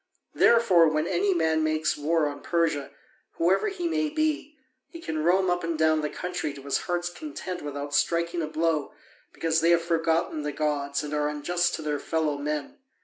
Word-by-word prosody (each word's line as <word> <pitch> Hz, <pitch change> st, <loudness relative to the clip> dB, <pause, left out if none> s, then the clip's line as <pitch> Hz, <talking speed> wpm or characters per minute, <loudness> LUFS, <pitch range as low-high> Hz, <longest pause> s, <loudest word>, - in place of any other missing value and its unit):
Therefore, 205 Hz, -8 st, +5 dB
when 155 Hz, 0 st, 0 dB
any 190 Hz, +3 st, +1 dB
man 160 Hz, -3 st, +2 dB
makes 155 Hz, 0 st, +1 dB
war 155 Hz, +2 st, +1 dB
on 145 Hz, 0 st, -6 dB
Persia, 165 Hz, -5 st, 0 dB, 0.4 s
whoever 185 Hz, -, +2 dB
he 370 Hz, -4 st, -2 dB
may 315 Hz, -2 st, 0 dB
be, 305 Hz, -1 st, -1 dB, 0.3 s
he 335 Hz, -, -10 dB
can 155 Hz, -, -3 dB
roam 185 Hz, +3 st, +3 dB
up 175 Hz, 0 st, -1 dB
and 165 Hz, -1 st, -2 dB
down 155 Hz, 0 st, +3 dB
the 150 Hz, -, -2 dB
country 180 Hz, -5 st, -4 dB
to 140 Hz, -, -11 dB
his 140 Hz, -1 st, 0 dB
heart's 175 Hz, 0 st, 0 dB
content 185 Hz, -, -6 dB
without 145 Hz, 0 st, -5 dB
striking 170 Hz, +3 st, +1 dB
a 155 Hz, -, -2 dB
blow, 155 Hz, -1 st, -1 dB, 0.4 s
because 165 Hz, -1 st, 0 dB
they 165 Hz, -, +3 dB
have 170 Hz, -1 st, +4 dB
forgotten 165 Hz, -2 st, 0 dB
the 150 Hz, 0 st, -3 dB
gods 145 Hz, -1 st, -1 dB
and 150 Hz, 0 st, -5 dB
are 150 Hz, 0 st, +1 dB
unjust 175 Hz, +4 st, 0 dB
to 160 Hz, -, -6 dB
their 150 Hz, -1 st, -1 dB
fellow 155 Hz, -2 st, -1 dB
men. 150 Hz, -, -4 dB
165 Hz, 190 wpm, -26 LUFS, 150-175 Hz, 0.4 s, Therefore